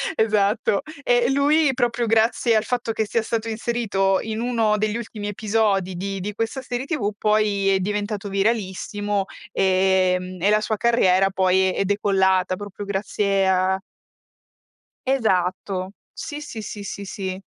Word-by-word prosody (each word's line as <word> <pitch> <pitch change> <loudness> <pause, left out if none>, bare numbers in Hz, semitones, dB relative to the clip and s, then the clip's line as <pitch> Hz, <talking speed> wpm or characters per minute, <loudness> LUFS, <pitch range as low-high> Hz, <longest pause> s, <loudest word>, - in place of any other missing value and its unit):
esatto. 210 -2 +2 0.2
Eh, 245 -1 +3
e - - 0
lui 290 +2 +3
proprio 240 -1 0
grazie 220 0 +5 0.3
grazie - - +3
al 215 - +3
fatto 240 0 -2
che 220 0 0
sia 225 +2 0
stato 225 0 -2
inserito, 215 -4 0
in 220 -1 -4
uno 230 -3 +1
degli 215 0 -1
ultimi 220 -3 -6
episodi 205 -3 0
di 195 +2 -4
di 205 +3 -4
questa 225 +5 -3
serie 250 0 -4
TV 250 -10 -1
poi, 210 -2 +2
è 195 -1 +3
diventato 205 +1 -3
viralissimo, 205 0 -1 0.3
ehm, 185 -1 +1
e 200 - +3
la 210 0 +3
sua 215 0 -1
carriera 195 -5 +3
poi 190 0 +2
è - - 0
decollata 190 -2 +2
proprio 205 +1 -8
grazie 195 -1 0
a 190 0 +2 1.3
Esatto, 185 -5 0 0.2
sì, 295 0 -7
sì, 240 -7 -7
sì, 210 -1 -7
sì, 200 0 -6
sì. 190 -1 -5
205 Hz, 150 wpm, -22 LUFS, 190-225 Hz, 1.3 s, grazie